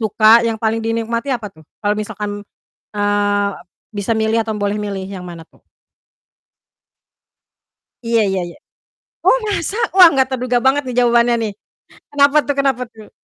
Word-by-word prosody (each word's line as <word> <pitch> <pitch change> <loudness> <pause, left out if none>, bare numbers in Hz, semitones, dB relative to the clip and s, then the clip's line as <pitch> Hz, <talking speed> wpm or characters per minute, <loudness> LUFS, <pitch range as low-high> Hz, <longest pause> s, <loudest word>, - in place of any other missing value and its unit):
suka 220 +1 +5
yang 230 -1 -1
paling 225 +1 -1
dinikmati 230 +3 -2
apa 235 -5 -2
tuh? 160 - -19 0.2
Kalau 205 0 +2
misalkan, 210 -1 -5 0.5
eee, 205 0 0 0.5
bisa 200 +2 -2
milih 220 0 0
atau 220 -1 -4
boleh 205 -1 -2
milih 200 -2 -5
yang 190 -2 -8
mana 170 -2 -9
tuh? - - -28 2.4
Iya 230 0 +2
iya 190 -1 -1
iya. 170 - -13 0.7
Oh, - - +5
masa? 400 0 -2 0.2
Wah, 370 -2 +10
enggak 265 -1 +2
terduga 250 -1 0
banget, 280 +2 +3
nih, 250 - -4
jawabannya, 240 0 +3
nih. 220 - -2 0.6
Kenapa, 285 +1 +3
tuh 285 - 0
kenapa, 270 -3 +1
tuh? 215 -2 -14
225 Hz, 150 wpm, -17 LUFS, 205-245 Hz, 2.4 s, Wah